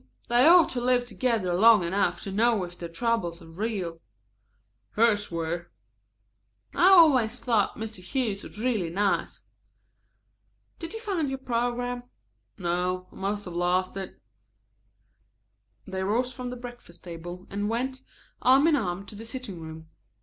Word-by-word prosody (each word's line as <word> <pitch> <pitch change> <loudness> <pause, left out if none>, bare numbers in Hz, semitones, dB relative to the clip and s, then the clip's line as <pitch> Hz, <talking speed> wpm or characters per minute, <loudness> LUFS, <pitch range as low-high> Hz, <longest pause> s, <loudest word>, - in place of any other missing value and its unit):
They 240 +4 +5
ought 345 -1 +7
to 245 - -2
live 245 0 +2
together 220 -4 -1
long 215 +1 +6
enough 190 +4 0
to 195 - -5
know 220 0 +2
if 175 0 -7
their 170 -1 -7
troubles 175 -3 -1
are - - -14
real." 175 -2 -4 0.9
"Hers 210 -2 +2
were." 170 +1 -3 1.0
"I 355 - +4
always 265 - +6
thought 225 -5 +1
Mr. 220 -3 -6
Hughes 215 -1 -2
was - - -11
real 215 -7 -1
nice. 200 +3 -1 1.4
Did 330 +3 -6
you - - -4
find 370 - -1
your 270 - -3
program?" 245 -1 -2 0.6
"No, 180 0 -1
I - - -17
must 205 +1 -3
have 180 - -7
lost 180 +2 0
it." 195 -1 -6 1.7
They 190 0 -4
rose 240 +6 0
from 250 0 -6
the 250 - -5
breakfast 240 -8 -11
table 175 +1 -8
and 205 +1 -2
went, 260 +3 -2 0.4
arm 265 +3 +5
in 325 - +4
arm, 195 -6 -2
to 215 - -12
the 210 +2 -8
sitting 225 -6 -7
room. 160 0 -9
215 Hz, 150 wpm, -27 LUFS, 180-245 Hz, 1.7 s, ought